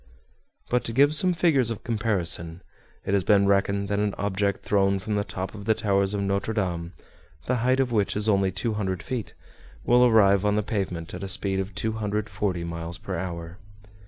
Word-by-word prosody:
But 125 0 +2
to 115 - -3
give 140 +4 +4
some 180 +4 +4
figures 160 -8 +2
of 115 -1 -5
comparison, 90 -7 -1 0.4
it 95 - -1
has 100 -2 +2
been 100 +1 +4
reckoned 100 0 +1
that 100 0 0
an 105 -1 0
object 100 0 -1
thrown 100 -1 +2
from 105 +3 -4
the 105 0 +1
top 95 -1 -5
of 100 -2 -9
the 110 0 +3
towers 100 -1 +1
of 100 - -1
Notre 100 +3 -1
Dame, 90 -4 -2 0.5
the 125 - 0
height 130 +3 +1
of 130 -2 +1
which 105 -4 +1
is 105 +1 0
only 100 -3 +2
200 95 -2 -2
feet, 125 -5 -5 0.5
will 125 +1 +5
arrive 100 -5 +5
on 105 0 +2
the 105 - +1
pavement 90 -6 -3
at 90 +2 -6
a - - -3
speed 95 0 0
of 95 0 -4
240 105 -3 -2
miles 85 0 -5
per 95 +3 -5
hour. 85 0 -6
100 Hz, 190 wpm, -25 LUFS, 95-110 Hz, 0.5 s, will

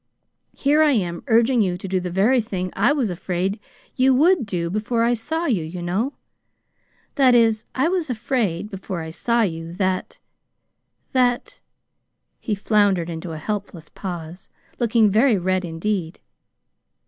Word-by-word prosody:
"Here 290 +3 +3
I 300 -2 +5
am 175 -7 -1
urging 235 +1 +4
you 180 -3 0
to 190 - -7
do 190 0 0
the 180 0 -4
very 215 +8 +3
thing 185 -4 -4
I 215 +8 +3
was 265 -9 0
afraid 180 +3 -2 0.4
you 260 0 +4
WOULD 310 - +3
do 170 -4 -2
before 220 +3 0
I 235 +1 +3
saw 320 +9 -2
you, 220 - +1
you 165 +3 -7
know. 205 +11 -1 1.1
That 255 -2 +6
is, 225 -2 +3
I 265 +5 +2
was 350 -4 -1
afraid 220 -5 -1
before 190 -2 -5
I 160 0 -6
saw 235 +7 +1
you, 165 -3 -3
that 185 0 -2 0.9
that 245 -2 0 0.4
" - - -54
He 215 - -2
floundered 200 -4 +2
into 165 +1 -6
a - - -5
helpless 195 -1 -5
pause, 175 -2 -7 0.3
looking 230 -3 +3
very 225 +2 +4
red 185 +1 0
indeed. 170 +1 -3
205 Hz, 155 wpm, -22 LUFS, 180-240 Hz, 1.1 s, That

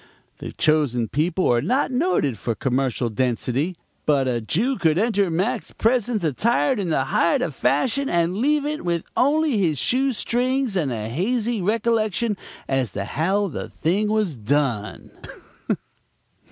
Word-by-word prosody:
The - - -6
Chosen 140 -7 +1
People 170 +5 0
are 120 - +2
not 260 - 0
noted 250 - +1
for 115 - -2
commercial 130 0 0
density; 125 - -1 0.3
but 140 -3 +3
a 120 -2 0
Jew 225 - 0
could 160 -1 +2
enter 205 -2 +2
Mac's 205 +9 -1
presence 230 -3 +1
attired 165 - +1
in 185 -4 -2
the 135 -4 +1
height 165 +5 +2
of 160 - -3
fashion 235 - 0
and 170 +1 +1
leave 290 +5 +2
it 305 +1 -3
with 170 -2 -1
only 290 -3 +2
his 160 -6 +1
shoe 265 - +1
strings 250 +1 0
and 155 -8 0
a 110 -2 -3
hazy 220 - -1
recollection 220 +1 0 0.3
as 130 -6 -1
to 100 0 -3
how 190 - 0
the - - -6
thing 195 +6 0
was 210 -7 0
done. 120 -2 -1
180 Hz, 150 wpm, -23 LUFS, -, 0.3 s, but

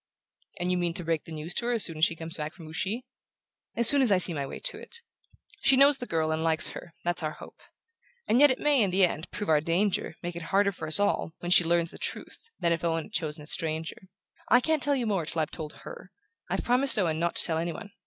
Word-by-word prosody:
"And 175 +1 -1
you 180 - 0
mean 170 -1 -2
to 180 - +1
break 165 -2 -2
the - - -11
news 160 +2 -4
to 235 - -1
her 245 - +1
as 230 - +1
soon 165 -3 -4
as 160 - +6
she 165 - -1
comes 165 +1 -4
back 155 -1 -5
from 165 -4 -12
Ouchy?" 190 +10 -3 0.7
"As 235 - +2
soon 285 -1 +6
as 250 -5 +3
I 190 - +5
see 180 -1 +5
my 140 -3 -3
way - - -7
to - - -5
it. 470 0 -10 0.6
She 270 - +4
knows 280 +1 +5
the 245 - -6
girl 160 -1 0
and 160 0 -1
likes 160 -1 +2
her: 170 - -10
that's 175 +1 -1
our 155 -1 -3
hope. - - -14 0.7
And 235 - +3
yet 290 +1 +7
it 260 - +1
may, 290 -4 +3
in 200 - +2
the 185 +1 +4
end, 165 -1 -5
prove 205 - -5
our 155 -2 +3
danger, 170 +1 -1
make 175 0 -5
it 170 - -6
harder 200 +1 +2
for 165 -4 -7
us 155 - +4
all, 200 -5 0
when 175 - -6
she 180 - +7
learns 170 0 +1
the - - -12
truth, 460 - -4
than 170 -1 +2
if 165 - -4
Owen 165 -1 0
had 215 - -16
chosen 155 -4 -3
a - - -12
stranger. 160 +3 -3 0.4
I 245 - +6
can't 315 +3 0
tell 285 +1 +4
you 250 -3 -1
more 195 -7 -1
till 165 - -3
I've 155 - -1
told 155 -2 -7
her: - - -11 0.4
I've - - -2
promised 255 +1 +3
Owen 165 -6 0
not 170 +1 -1
to - - +5
tell 160 -2 0
any 170 +1 -2
one. 200 +4 -9
175 Hz, 270 wpm, -27 LUFS, 160-215 Hz, 0.7 s, yet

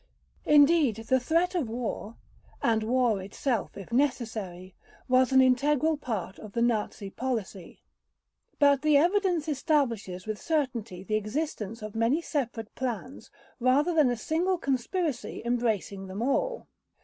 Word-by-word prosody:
Indeed 295 -4 +5
the 260 - +4
threat 335 +8 +1
of 320 -11 -1
war—and 230 -1 -4
war 230 -2 +1
itself 220 +4 -3
if 195 +2 -9
necessary—was 235 -1 -1
an 265 0 +6
integral 290 +5 +3
part 220 -9 -5
of 215 -2 -10
the 235 - -1
Nazi 215 -3 -1
policy. 220 -8 -5 0.7
But 285 -2 +4
the 305 -1 +4
evidence 350 0 +2
establishes 245 - 0
with 215 -1 -4
certainty 240 - -2
the 215 +3 0
existence 220 -2 -4
of 215 -1 -6
many 230 +7 +2
separate 240 -9 -3
plans 255 +1 -5 0.3
rather 270 +7 +3
than 305 -5 +4
a 245 - -1
single 340 - 0
conspiracy 275 - -2
embracing 220 -5 -1
them 195 +4 -4
all. - - 0
250 Hz, 125 wpm, -28 LUFS, 220-295 Hz, 0.7 s, an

